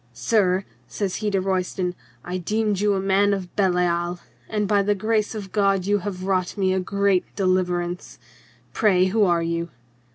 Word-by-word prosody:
"Sir," 185 - +1 0.2
says 195 -3 -3
he 215 -1 -1
to 195 -1 +1
Royston, 185 -1 -1 0.3
"I 180 +1 -3
deemed 210 +2 0
you 205 0 +2
a - - 0
man 195 +1 +2
of 185 -3 -8
Belial, 175 -2 +1 0.3
and 210 -2 -1
by 205 0 +3
the 205 +1 +1
grace 215 +2 0
of 200 -3 -6
God 195 -3 +2
you 205 +1 +2
have 185 -1 -5
wrought 185 0 -1
me 190 -1 +2
a 190 - +1
great 200 0 +1
deliverance. 180 -2 -1 0.6
Pray, 190 -4 +3
who 210 +3 +2
are 170 -2 +2
you 170 0 -2
190 Hz, 170 wpm, -23 LUFS, 180-205 Hz, 0.6 s, by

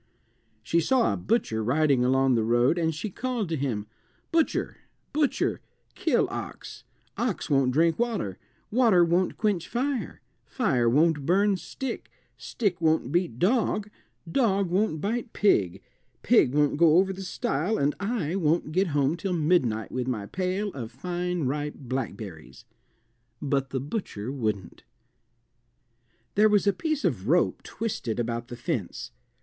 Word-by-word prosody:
She 165 +9 +2
saw 240 +8 +2
a - - -1
butcher 115 - 0
riding 140 +1 +2
along 130 +1 +3
the 115 - +2
road, 120 +8 +3
and 160 -1 +1
she 160 +7 -5
called 240 -4 -3
to 165 - 0
him 125 -8 -2 0.5
"Butcher, 330 -1 0 0.4
butcher, 295 -2 0 0.3
kill - - +1
ox; - - -7 0.4
ox 230 -9 -2
won't 135 -2 +3
drink 165 - +2
water, 220 - -1 0.3
water 215 -7 +5
won't 175 +2 +1
quench 205 -6 0
fire, 260 +1 -2 0.2
fire 130 - +1
won't 150 +2 +2
burn 200 +3 +3
stick, 250 +7 -6 0.3
stick 190 -7 -2
won't 160 -5 +2
beat 170 -9 0
dog, 210 - +1 0.4
dog 195 -3 +1
won't 185 -5 +1
bite 230 +4 -2
pig, 100 - +2 0.4
pig 180 - +4
won't 145 -1 +2
go 165 0 +6
over 190 +1 +3
the 190 - -8
stile, 180 +1 -1
and 145 +1 +1
I 200 -5 -1
won't 165 -3 +1
get 185 +4 +2
home 140 +3 +2
till 185 +1 -3
midnight 150 -10 +1
with 130 -1 -2
my 110 -6 -2
pail 185 - -2
of 120 -4 -6
fine 175 +5 -3
ripe 145 +3 -2
blackberries." 105 - -6 0.7
But 135 -2 -1
the 130 - -2
butcher 135 - -4
wouldn't. 110 -9 -3 1.5
There 215 +1 +5
was 210 -1 +3
a 200 - +4
piece 310 - -2
of 110 - -1
rope 170 +5 +2
twisted 160 - -4
about 120 0 -2
the 120 - -7
fence. 120 - -4
165 Hz, 145 wpm, -27 LUFS, 130-200 Hz, 1.5 s, go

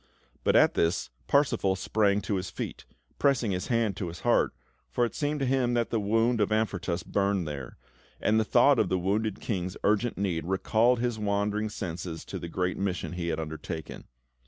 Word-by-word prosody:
But - - +3
at - - +6
this, 80 -7 0 0.2
Parsifal 135 -9 +2
sprang 100 +1 +1
to 100 - -1
his 95 0 -4
feet, - - -6 0.3
pressing 130 -7 +2
his 90 -1 -2
hand 115 -5 +1
to 95 - -3
his 85 +2 -8
heart, 120 +2 +3 0.4
for 120 - +1
it 115 - -5
seemed 150 0 -1
to - - +2
him 125 -2 +1
that 120 -1 0
the 115 - +1
wound 115 +3 +2
of 105 - +1
Amfortas 95 -5 0
burned 100 -3 0
there; 70 -4 -6 0.4
and 110 +1 +3
the - - +3
thought 135 +4 +5
of 100 - +2
the 95 - +1
wounded 100 +3 -1
King's 95 -3 -3
urgent 110 +3 +1
need 90 -5 -1
recalled 110 +6 +3
his 120 -3 -1
wandering 105 +1 0
senses 85 -4 -5
to - - -5
the 85 - -6
great 90 +1 -1
mission 95 -3 -2
he 90 -1 -4
had 80 - -1
undertaken. 80 0 -6
100 Hz, 190 wpm, -28 LUFS, 90-115 Hz, 0.4 s, at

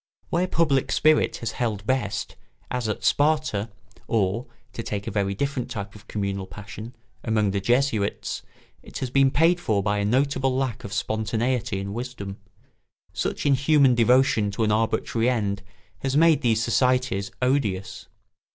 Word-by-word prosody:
Where 175 +2 +1
public 155 -7 +1
spirit 155 0 +3
has 115 -1 -2
held 110 -4 -2
best, 110 -5 -1 0.4
as 125 -3 -1
at 105 - -3
Sparta 145 -8 +2 0.4
or 110 +1 0 0.3
(to - - -4
take 100 -3 -4
a - - -3
very 100 -1 0
different 140 +1 -2
type 100 -2 -5
of 105 - -15
communal 100 -2 -3
passion) 105 +4 -9 0.3
among 110 -3 +1
the 100 0 -1
Jesuits, 120 -2 0 0.4
it - - -9
has 130 -2 -3
been 135 0 +5
paid 165 +6 +3
for 105 - 0
by 105 0 0
a 100 - 0
notable 135 +2 +1
lack 130 -3 -2
of 100 - -7
spontaneity 110 +1 -1
and 100 +1 -5
wisdom; 115 -5 -6 0.8
such - - -2
inhuman 140 -1 +4
devotion 120 -2 +3
to 100 +3 -2
an 105 - +2
arbitrary 115 +2 +1
end 100 -5 -1 0.4
has 135 +1 0
made 165 -1 +5
these 115 -2 +2
societies 125 -4 +1
odious. 125 -8 -1
115 Hz, 150 wpm, -25 LUFS, 105-135 Hz, 0.8 s, been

